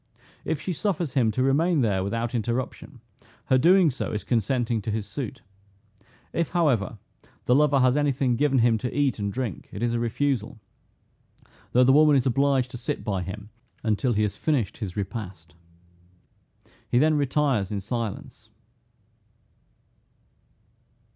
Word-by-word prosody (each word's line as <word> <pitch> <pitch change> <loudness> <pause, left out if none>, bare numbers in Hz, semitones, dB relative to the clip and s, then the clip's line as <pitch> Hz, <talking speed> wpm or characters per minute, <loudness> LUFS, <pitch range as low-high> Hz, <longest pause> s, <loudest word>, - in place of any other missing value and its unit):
If 160 - -2
she 180 - -3
suffers 175 -4 -2
him 125 -5 +2
to 120 +4 0
remain 155 +4 +2
there 100 -5 +1
without 115 +4 -2
interruption, 120 +2 -4 0.4
her 130 - +3
doing 175 +2 +5
so 130 - -4
is 105 - -3
consenting 120 0 0
to 105 - -5
his 105 -1 -2
suit. 130 +4 -6 0.9
If, 170 -1 0
however, 130 - +1 0.5
the 125 - +3
lover 140 0 +4
has 130 0 +4
any 145 -1 +2
thing 130 -2 0
given 140 +1 +2
him 115 -2 +3
to 125 +5 -4
eat 140 -5 +1
and 100 -1 -2
drink, 125 -1 -5
it 100 - -5
is 120 -1 +1
a 120 - 0
refusal; 120 -1 -1 1.2
though 125 - +5
the 130 +1 +5
woman 150 0 +6
is 135 -2 +2
obliged 135 0 +1
to - - -6
sit 115 - -4
by 100 -3 -2
him 100 +3 -7 0.3
until 115 +3 +1
he 105 0 +1
has 105 - -1
finished 140 -10 -1
his 100 -4 -6
repast. 95 -6 -6 1.4
He - - +2
then 155 +4 +4
retires 140 -7 +1
in 105 - -2
silence. 110 +1 -5
125 Hz, 155 wpm, -25 LUFS, 110-140 Hz, 1.4 s, woman